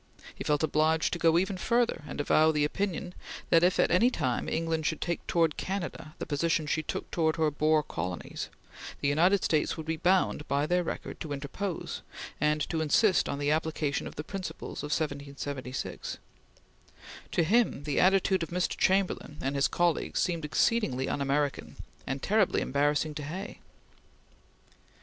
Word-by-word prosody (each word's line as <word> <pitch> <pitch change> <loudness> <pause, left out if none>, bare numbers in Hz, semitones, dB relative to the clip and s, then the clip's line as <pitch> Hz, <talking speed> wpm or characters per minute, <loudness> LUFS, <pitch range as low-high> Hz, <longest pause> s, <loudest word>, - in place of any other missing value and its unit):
He - - -7
felt 150 0 +1
obliged 155 +1 +2
to 175 - -2
go 165 0 +4
even 190 +2 0
further, 235 +1 +1
and - - -6
avow 155 +2 +4
the 150 -1 +2
opinion 180 +1 -2 0.4
that 165 - +6
if 180 +1 +3
at - - +3
any 185 +8 +5
time 130 - -1
England 165 -1 -1
should 160 - -1
take 170 -1 -3
towards 165 -3 +2
Canada 175 -5 -4
the - - -4
position 155 +1 0
she 155 +1 0
took - - -5
towards 160 -2 +1
her 155 -2 +2
Boer 155 +1 +2
colonies, 90 - -5 0.5
the - - 0
United 175 +7 +3
States 155 0 +1
would 160 - -6
be 160 0 -2
bound, 180 -4 +2
by 140 +1 +1
their 180 +2 +1
record, - - -5
to 155 - -6
interpose, 160 +7 -4 0.4
and 150 0 +1
to 160 -2 -1
insist 185 +4 +3
on 140 - -2
the 145 +1 0
application 155 -2 -1
of - - -9
the 150 - -4
principles 185 +3 -6
of 145 - -4
1776. 140 -3 -4 1.2
To 170 - +3
him 215 - +2
the 145 -1 0
attitude 190 0 +3
of 165 - -3
Mr. 180 +1 -1
Chamberlain 190 -5 +1
and 135 - -2
his 140 - +3
colleagues 175 -2 0
seemed 170 -3 0
exceedingly 150 - +1
un 145 - -2
American, 140 +1 -1 0.3
and 135 0 -3
terribly 210 -2 +2
embarrassing 145 +2 +1
to 150 - -5
Hay. 170 +7 -6
160 Hz, 170 wpm, -29 LUFS, 145-180 Hz, 1.2 s, that